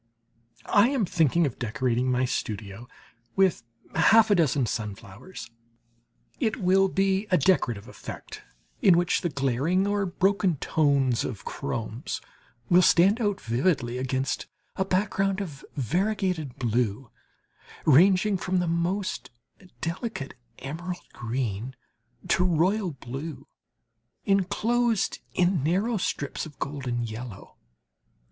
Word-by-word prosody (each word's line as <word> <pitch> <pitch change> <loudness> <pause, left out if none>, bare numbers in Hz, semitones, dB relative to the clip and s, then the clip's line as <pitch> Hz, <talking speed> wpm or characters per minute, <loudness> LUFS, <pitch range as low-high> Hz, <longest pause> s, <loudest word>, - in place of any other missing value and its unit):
I 205 +4 +4
am 265 -7 +1
thinking 170 -1 +2
of 135 - -4
decorating 125 +2 0
my 125 +1 +2
studio 110 -2 -4 0.5
with 190 -10 +3 0.3
half 220 -1 +5
a - - +8
dozen 145 -7 +2
sunflowers. 105 - -6 0.9
It 225 -5 +1
will 195 -2 +3
be 195 +2 +1
a 180 - +4
decorative 130 - +1
effect - - -9 0.4
in 180 -4 +6
which 175 0 +1
the 175 - -1
glaring 140 +7 +1
or 205 -1 0
broken 190 0 +1
tones 140 -5 +2
of 110 -7 -6
chromes 120 -4 -4 0.5
will 180 +1 +6
stand 195 +6 +4
out 205 -2 0
vividly 120 0 0
against 130 +1 -2 0.3
a 190 - +1
background 195 0 0
of 155 -9 -6
variegated 175 - -1
blue, 120 -1 -1 0.7
ranging 190 +7 +5
from 185 +1 -1
the 180 -1 +1
most 170 -6 -1 0.5
delicate 170 - -4 0.2
emerald 175 +6 -6
green 120 0 -3 0.5
to - - +3
royal 185 +4 +2
blue, 135 +2 -7 0.8
enclosed 215 +4 +1 0.2
in 180 -3 +2
narrow 195 +9 +1
strips 145 -5 -3
of 150 - -15
golden 130 -4 -3
yellow. 115 -2 -8
165 Hz, 115 wpm, -26 LUFS, 125-190 Hz, 0.9 s, a